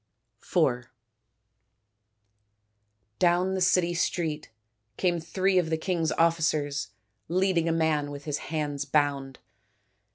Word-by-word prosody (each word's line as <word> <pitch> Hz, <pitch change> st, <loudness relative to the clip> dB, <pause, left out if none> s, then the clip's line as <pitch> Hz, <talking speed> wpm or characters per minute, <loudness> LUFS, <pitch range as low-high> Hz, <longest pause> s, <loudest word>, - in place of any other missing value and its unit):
IV 120 Hz, 0 st, 0 dB, 2.3 s
Down 180 Hz, +2 st, +3 dB
the 190 Hz, -, -2 dB
city 180 Hz, -1 st, +3 dB
street 160 Hz, -3 st, -2 dB, 0.5 s
came 175 Hz, -2 st, +1 dB
three 185 Hz, +3 st, +1 dB
of 165 Hz, -3 st, -1 dB
the 160 Hz, -, 0 dB
king's 165 Hz, -1 st, -1 dB
officers 155 Hz, -4 st, +1 dB, 0.4 s
leading 180 Hz, -2 st, +1 dB
a -, -, +2 dB
man 160 Hz, -3 st, +1 dB
with 145 Hz, 0 st, -8 dB
his 150 Hz, -1 st, -2 dB
hands 145 Hz, -3 st, -2 dB
bound. 140 Hz, -2 st, 0 dB
160 Hz, 105 wpm, -27 LUFS, 145-175 Hz, 2.3 s, Down